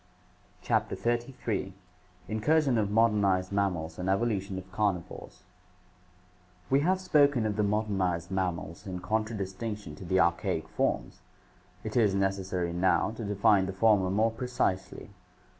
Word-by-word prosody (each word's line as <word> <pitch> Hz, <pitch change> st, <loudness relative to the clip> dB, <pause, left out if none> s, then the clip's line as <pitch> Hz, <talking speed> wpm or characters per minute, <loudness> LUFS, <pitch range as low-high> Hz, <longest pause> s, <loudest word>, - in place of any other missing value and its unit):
CHAPTER -, -, 0 dB
XXXHI 120 Hz, -4 st, -2 dB, 0.5 s
Incursion 135 Hz, +3 st, +2 dB
of 105 Hz, -2 st, 0 dB
Modernized 100 Hz, -4 st, +2 dB
Mammals 90 Hz, -5 st, -1 dB
and 90 Hz, +1 st, -2 dB
Evolution 100 Hz, -2 st, 0 dB
of 95 Hz, 0 st, -9 dB
Carnivores 95 Hz, -3 st, -3 dB, 1.3 s
We 135 Hz, -, +5 dB
have 185 Hz, +5 st, +2 dB
spoken 145 Hz, -9 st, +3 dB
of 105 Hz, -1 st, -1 dB
the 105 Hz, -, +1 dB
modernized 100 Hz, -5 st, 0 dB
mammals 90 Hz, 0 st, -3 dB
in 95 Hz, -1 st, -4 dB
contradistinction 105 Hz, -2 st, -3 dB
to -, -, -9 dB
the 95 Hz, +1 st, +1 dB
archaic 85 Hz, -1 st, +1 dB
forms. -, -, -2 dB, 0.6 s
It 110 Hz, -, -5 dB
is 105 Hz, -5 st, +3 dB
necessary 95 Hz, -3 st, -1 dB
now 95 Hz, +4 st, +2 dB
to 115 Hz, +1 st, -7 dB
define 100 Hz, -1 st, +3 dB
the 95 Hz, -, -4 dB
former 100 Hz, -2 st, +3 dB
more 110 Hz, +4 st, +2 dB
precisely. 115 Hz, -5 st, -2 dB
100 Hz, 125 wpm, -29 LUFS, 95-110 Hz, 1.3 s, We